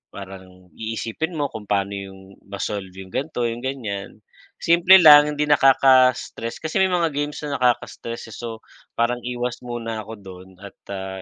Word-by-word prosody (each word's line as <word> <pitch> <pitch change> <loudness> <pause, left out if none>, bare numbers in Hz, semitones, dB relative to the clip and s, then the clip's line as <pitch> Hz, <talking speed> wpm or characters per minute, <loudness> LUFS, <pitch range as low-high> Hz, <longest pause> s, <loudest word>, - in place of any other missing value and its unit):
parang 95 -1 -9 0.3
iisipin 115 +9 -4
mo 145 - 0
kung 105 -2 -8
paano 100 -1 0
yung 95 0 -10
ma-solve, 100 -1 -4
yung 95 -1 -10
ganito 135 -4 -2
yung 115 +1 -5
ganyan. 105 -6 -5 0.4
Simple 175 +3 +6
lang 150 -1 +8
hindi 150 - 0
nakaka-stress, 130 -4 +3
kasi 160 +3 -1
may 190 - +3
mga 170 -3 +1
games 145 +1 -3
na 145 -1 -3
nakaka-stress 115 -2 -2
eh, - - -9
so, 115 -2 -7 0.4
parang 120 +1 +1
iwas 125 0 -4
muna 115 -2 -5
ako 110 - -8
dun 95 -1 -12
at, 100 - -11 0.2
ah, 95 0 -6
115 Hz, 160 wpm, -22 LUFS, 100-140 Hz, 0.4 s, lang